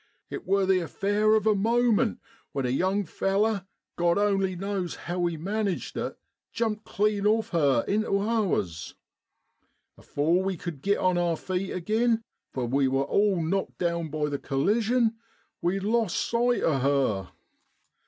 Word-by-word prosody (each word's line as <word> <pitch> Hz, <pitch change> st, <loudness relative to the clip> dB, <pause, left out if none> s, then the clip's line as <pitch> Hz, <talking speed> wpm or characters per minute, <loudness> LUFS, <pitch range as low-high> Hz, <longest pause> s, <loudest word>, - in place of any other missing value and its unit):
It 390 Hz, -, -6 dB
wor 195 Hz, 0 st, +3 dB
the 190 Hz, -1 st, +3 dB
affair 205 Hz, +5 st, +1 dB
of 215 Hz, -, +1 dB
a 215 Hz, -, +5 dB
moment, 230 Hz, +1 st, +2 dB, 0.4 s
when 135 Hz, -3 st, -1 dB
a -, -, 0 dB
young 190 Hz, +9 st, +1 dB
feller, 195 Hz, +2 st, 0 dB, 0.3 s
Grod 170 Hz, +1 st, +3 dB
only 195 Hz, -2 st, +1 dB
knows 195 Hz, -1 st, -3 dB
how 175 Hz, 0 st, 0 dB
he 170 Hz, -1 st, -3 dB
managed 200 Hz, +2 st, -2 dB
it, -, -, -4 dB, 0.3 s
jumped 220 Hz, -2 st, -2 dB
clean 210 Hz, 0 st, +1 dB
off 220 Hz, +1 st, +2 dB
her 140 Hz, -9 st, +2 dB
intu 205 Hz, -1 st, +1 dB
ours. 200 Hz, -, -1 dB, 1.0 s
Afore 165 Hz, +5 st, +1 dB
we 190 Hz, -1 st, -2 dB
cud 160 Hz, -5 st, -6 dB
git 200 Hz, +5 st, +2 dB
on 185 Hz, -1 st, +2 dB
our 170 Hz, -2 st, +1 dB
feet 185 Hz, +2 st, -3 dB
agin 225 Hz, +5 st, +1 dB, 0.3 s
for 130 Hz, -2 st, -2 dB
we 135 Hz, +3 st, +2 dB
was 135 Hz, +1 st, +1 dB
all 200 Hz, -4 st, +2 dB
knocked 195 Hz, +5 st, -2 dB
down 170 Hz, -2 st, -1 dB
by 150 Hz, 0 st, -1 dB
the 145 Hz, -1 st, -3 dB
collision 220 Hz, -, +1 dB, 0.4 s
we 180 Hz, +3 st, 0 dB
lost 220 Hz, -1 st, 0 dB
sight 240 Hz, +1 st, +1 dB
o' 145 Hz, -4 st, +2 dB
her. 130 Hz, -9 st, +1 dB
195 Hz, 155 wpm, -27 LUFS, 165-215 Hz, 1.0 s, a